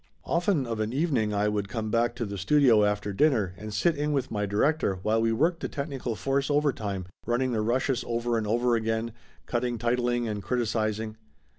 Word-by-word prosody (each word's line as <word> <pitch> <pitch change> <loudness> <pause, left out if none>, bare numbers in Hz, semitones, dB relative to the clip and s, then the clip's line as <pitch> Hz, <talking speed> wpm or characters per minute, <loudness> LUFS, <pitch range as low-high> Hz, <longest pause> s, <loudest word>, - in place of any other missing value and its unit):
Often 170 -4 +1
of 115 -2 -3
a 110 - +1
evening 130 -4 0
I 105 0 +1
would 105 -1 -1
come 110 0 -3
back 120 +1 +1
to 120 - -3
the 100 -1 -5
studio 120 0 +5
after 105 0 0
dinner 110 - +2
and 105 +4 -8
sit 130 - +2
in 150 +1 -1
with 135 -3 -1
my 105 -2 -1
director 105 +2 +1
while 110 +1 +2
we 115 0 +2
worked 165 +9 +1
the - - -4
technical 140 -5 -4
force 135 +4 0
over 145 -1 +2
time, 100 -5 -4 0.2
running 125 +2 +1
the 110 -2 0
rushes 125 +3 0
over 120 0 -1
and 110 -2 -1
over, 120 +2 +2 0.7
cutting 120 0 -1
titling 120 +1 0
and 105 -2 -3
criticizing. 110 -2 -1
120 Hz, 190 wpm, -27 LUFS, 105-135 Hz, 0.7 s, studio